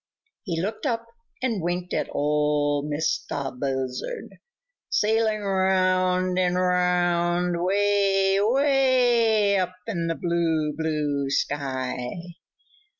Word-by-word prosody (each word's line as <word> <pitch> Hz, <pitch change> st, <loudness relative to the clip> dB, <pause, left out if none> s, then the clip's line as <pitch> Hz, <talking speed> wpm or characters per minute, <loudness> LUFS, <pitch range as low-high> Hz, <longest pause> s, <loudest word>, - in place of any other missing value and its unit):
He 170 Hz, -6 st, -3 dB
looked 215 Hz, -, -3 dB
up 230 Hz, -2 st, -1 dB, 0.4 s
and 230 Hz, -7 st, 0 dB
winked 175 Hz, +1 st, -3 dB
at -, -, -1 dB
Ol' 150 Hz, 0 st, +1 dB
Mistah 145 Hz, -2 st, -2 dB
Buzzard, 130 Hz, -, -4 dB, 0.5 s
sailing 220 Hz, 0 st, +1 dB
round 185 Hz, -1 st, +1 dB
and 180 Hz, -1 st, +1 dB
round 180 Hz, -1 st, +1 dB
way, 195 Hz, 0 st, +2 dB
way 240 Hz, -5 st, +3 dB
up 185 Hz, 0 st, -2 dB
in 170 Hz, -7 st, -2 dB
the 165 Hz, -, -1 dB
blue, 165 Hz, -3 st, 0 dB
blue 150 Hz, -3 st, -1 dB
sky. 135 Hz, -2 st, -2 dB
180 Hz, 95 wpm, -25 LUFS, 150-205 Hz, 0.5 s, way